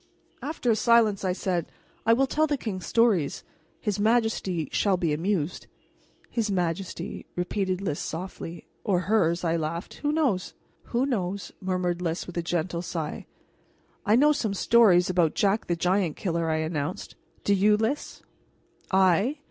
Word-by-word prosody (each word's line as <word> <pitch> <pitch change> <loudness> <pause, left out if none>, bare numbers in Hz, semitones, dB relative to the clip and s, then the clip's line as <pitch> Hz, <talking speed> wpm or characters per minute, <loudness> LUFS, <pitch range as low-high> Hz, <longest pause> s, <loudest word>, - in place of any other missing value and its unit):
After 285 -5 -1
a - - +3
silence 220 -3 +3
I 185 - +1
said: 180 -2 -1 0.4
"I 230 - +7
will 265 +4 +3
tell 310 +4 +1
the 290 -1 0
king 205 -7 -4
stories. 205 -10 +2 0.4
His 210 -1 -2
majesty 215 - +1
shall 195 -3 +2
be 170 -4 0
amused." 175 0 -1 0.6
"His 225 -3 0
majesty," 180 0 -3
repeated 185 +1 -1
Lys 155 -7 -2
softly. 170 0 -6 0.2
"Or 190 -5 +1
hers," 175 -4 +1
I 165 -1 +1
laughed. 165 +3 -4
"Who 295 - +1
knows?" 270 - 0 0.3
"Who 245 +2 0
knows?" 200 -7 -2
murmured 180 -2 -1
Lys; 170 -1 -2
with 175 - -9
a 170 - 0
gentle 170 0 -2
sigh. 165 -3 -5 0.8
"I 210 +2 +4
know 295 +5 +5
some 225 -9 -1
stories 195 -5 +5
about 175 -4 +2
Jack 205 +2 +1
the 175 - +1
Giant 180 -1 +1
Killer," 170 -3 -1
I 160 - +1
announced. 155 +1 -3 0.3
"Do 200 - +3
you, 210 +2 +4
Lys?" 225 +7 -2 0.7
"I? 190 - +3
185 Hz, 155 wpm, -26 LUFS, 170-220 Hz, 0.8 s, I